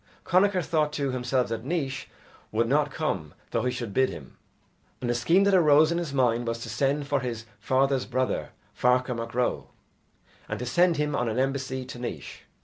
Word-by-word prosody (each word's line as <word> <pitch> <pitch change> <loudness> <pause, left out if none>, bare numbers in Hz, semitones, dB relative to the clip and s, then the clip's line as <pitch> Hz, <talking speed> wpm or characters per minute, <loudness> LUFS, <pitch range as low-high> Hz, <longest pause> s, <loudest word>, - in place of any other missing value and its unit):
Connachar 185 0 +3
thought 155 -3 +1
to 140 -3 -1
himself 125 0 0
that 115 -1 -3
Naois 140 -3 -2 0.5
would 115 +2 +1
not 145 +4 +2
come 95 - -3 0.2
though - - +1
he 125 - 0
should 115 -5 -5
bid 130 +3 +3
him, 70 -4 -10 0.6
and 125 - -3
the - - +2
scheme 165 +11 +3
that 200 0 +3
arose 155 -3 +6
in 170 - 0
his 170 -5 -4
mind 120 -3 +1
was 115 0 -1
to - - -7
send 140 +6 0
for 145 -1 +1
his 120 -3 -4
father's 135 0 +1
brother, 130 +1 -1 0.3
Ferchar 125 +1 +2
Mac 115 0 -6
Ro, 125 0 0 0.8
and - - -2
to 125 - -4
send 170 +7 +3
him 150 0 0
on 120 -1 0
an 110 - -3
embassy 130 -1 -1
to 125 -1 -9
Naois. 120 - -6
130 Hz, 195 wpm, -27 LUFS, 120-150 Hz, 0.8 s, arose